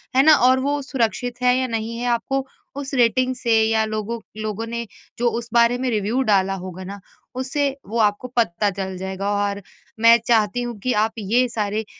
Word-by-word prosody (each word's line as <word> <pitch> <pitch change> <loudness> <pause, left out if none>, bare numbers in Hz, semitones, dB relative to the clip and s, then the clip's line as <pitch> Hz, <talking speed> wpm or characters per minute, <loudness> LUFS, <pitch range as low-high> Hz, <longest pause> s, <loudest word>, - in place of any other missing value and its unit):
है 265 - +6
ना? 310 +1 +8
और 255 -1 +4
वो 285 +2 -1
सुरक्षित 245 -1 -2
है 250 0 +4
या 260 0 0
नहीं 230 0 -3
है 245 - -3
आपको 265 +3 0 0.3
उस 280 -1 -6
रेटिंग 255 +1 +2
से 235 -3 +2
या 220 0 +2
लोगों 215 +2 -4 0.2
लोगों 215 +1 -3
ने 235 0 -4 0.3
जो 240 0 +3
उस 235 0 -10
बारे 235 +1 +4
में 255 0 -1
रिव्यू 220 +3 0
डाला 195 -5 +2
होगा 185 0 -7
ना 200 +2 -8 0.4
उससे 270 +2 -1 0.2
वो 225 +4 -4
आपको 210 +3 +1
पता 210 -2 +2
चल 190 -1 -5
जाएगा। 190 +1 -4
और 205 0 -1 0.4
मैं 230 +1 +7
चाहती 225 0 +2
हूँ 240 -2 -5
कि 250 +4 -1
आप 220 - -1
ये 235 +5 +2
सारे 215 -1 -2
230 Hz, 195 wpm, -22 LUFS, 210-250 Hz, 0.4 s, ना